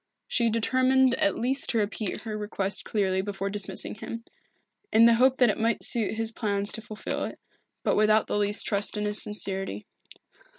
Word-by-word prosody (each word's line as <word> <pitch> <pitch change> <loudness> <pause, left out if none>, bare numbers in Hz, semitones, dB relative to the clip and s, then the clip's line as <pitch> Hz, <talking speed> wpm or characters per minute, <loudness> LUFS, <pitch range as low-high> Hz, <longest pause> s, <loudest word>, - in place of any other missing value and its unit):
She 235 -2 +1
determined 255 +3 +3
at 305 +2 +1
least 260 +4 -1
to 230 - 0
repeat 210 -1 -2
her 220 -2 -5
request 205 -2 -2
clearly 190 -3 0
before 195 0 -4
dismissing 205 -1 -3
him, 230 +2 -7 0.7
in 225 +1 +6
the 235 - +7
hope 255 +3 +4
that 245 -4 +5
it - - -6
might 225 0 0
suit 225 -3 -1
his 225 0 -3
plans 205 -3 -2
to 225 - -3
fulfil 215 0 -4
it, - - -8 0.4
but - - +2
without 215 +1 +4
the 205 - -1
least 205 +1 +2
trust 205 0 0
in 210 - -1
his 210 0 +1
sincerity. 195 -1 -3
215 Hz, 180 wpm, -27 LUFS, 205-230 Hz, 0.7 s, the